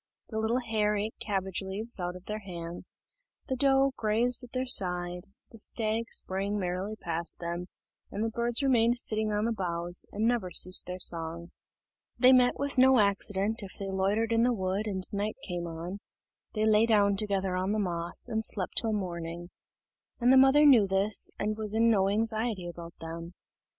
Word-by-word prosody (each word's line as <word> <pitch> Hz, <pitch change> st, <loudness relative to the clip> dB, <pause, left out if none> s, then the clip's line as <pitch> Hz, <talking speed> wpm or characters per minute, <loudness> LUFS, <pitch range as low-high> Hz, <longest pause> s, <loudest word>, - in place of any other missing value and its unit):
The 220 Hz, -, -3 dB
little 230 Hz, +3 st, 0 dB
hare 215 Hz, -3 st, 0 dB
ate 215 Hz, +2 st, -3 dB
cabbage 195 Hz, -3 st, -2 dB
leaves 200 Hz, +4 st, 0 dB
out 175 Hz, 0 st, -3 dB
of 180 Hz, -, -12 dB
their 215 Hz, 0 st, -4 dB
hands, 175 Hz, -3 st, -4 dB, 0.5 s
the 260 Hz, -, -1 dB
doe 270 Hz, +1 st, +3 dB
grazed 235 Hz, +4 st, +1 dB
at 245 Hz, -, -12 dB
their 255 Hz, 0 st, -2 dB
side, 180 Hz, -6 st, +1 dB, 0.3 s
the 225 Hz, -, -11 dB
stag 220 Hz, +1 st, -1 dB
sprang 195 Hz, +2 st, -1 dB
merrily 185 Hz, +2 st, -3 dB
past 170 Hz, -4 st, -3 dB
them, 170 Hz, +1 st, -5 dB, 0.4 s
and 210 Hz, -, -3 dB
the 225 Hz, -, -1 dB
birds 235 Hz, +3 st, -1 dB
remained 240 Hz, -3 st, +3 dB
sitting 215 Hz, -2 st, +2 dB
on 210 Hz, +1 st, 0 dB
the 235 Hz, -, 0 dB
boughs, 175 Hz, -4 st, -2 dB
and 210 Hz, +2 st, -1 dB
never 235 Hz, -6 st, 0 dB
ceased 185 Hz, 0 st, +3 dB
their 180 Hz, 0 st, -5 dB
songs. 170 Hz, 0 st, -3 dB, 0.6 s
They 255 Hz, +2 st, +6 dB
met 250 Hz, -1 st, +4 dB
with 280 Hz, -1 st, -2 dB
no 260 Hz, 0 st, +6 dB
accident 205 Hz, +1 st, +2 dB
if 195 Hz, -2 st, -9 dB
they 195 Hz, -1 st, -5 dB
loitered 200 Hz, +4 st, 0 dB
in 230 Hz, -, +3 dB
the 245 Hz, 0 st, +2 dB
wood 190 Hz, +2 st, -2 dB
and 190 Hz, -2 st, -3 dB
right 205 Hz, +2 st, -2 dB
came 175 Hz, -2 st, -4 dB
on; 170 Hz, +4 st, -6 dB, 0.6 s
they 215 Hz, 0 st, +1 dB
lay 220 Hz, +1 st, +4 dB
down 205 Hz, -3 st, +3 dB
together 195 Hz, -2 st, -1 dB
on 185 Hz, +2 st, -1 dB
the 215 Hz, -, 0 dB
moss, 175 Hz, -4 st, -3 dB
and 220 Hz, 0 st, -2 dB
slept 195 Hz, -4 st, +1 dB
till 225 Hz, -2 st, +3 dB
morning; 175 Hz, -3 st, -5 dB, 0.7 s
and 245 Hz, +1 st, +4 dB
the -, -, +6 dB
mother 270 Hz, +3 st, +6 dB
knew 240 Hz, -8 st, +6 dB
this, 195 Hz, +2 st, +2 dB
and 215 Hz, +1 st, -2 dB
was 215 Hz, -1 st, -2 dB
in 230 Hz, +1 st, +4 dB
no 195 Hz, -3 st, +2 dB
anxiety 220 Hz, -2 st, -1 dB
about 170 Hz, -1 st, -9 dB
them. 165 Hz, +1 st, -7 dB
205 Hz, 185 wpm, -29 LUFS, 180-225 Hz, 0.7 s, They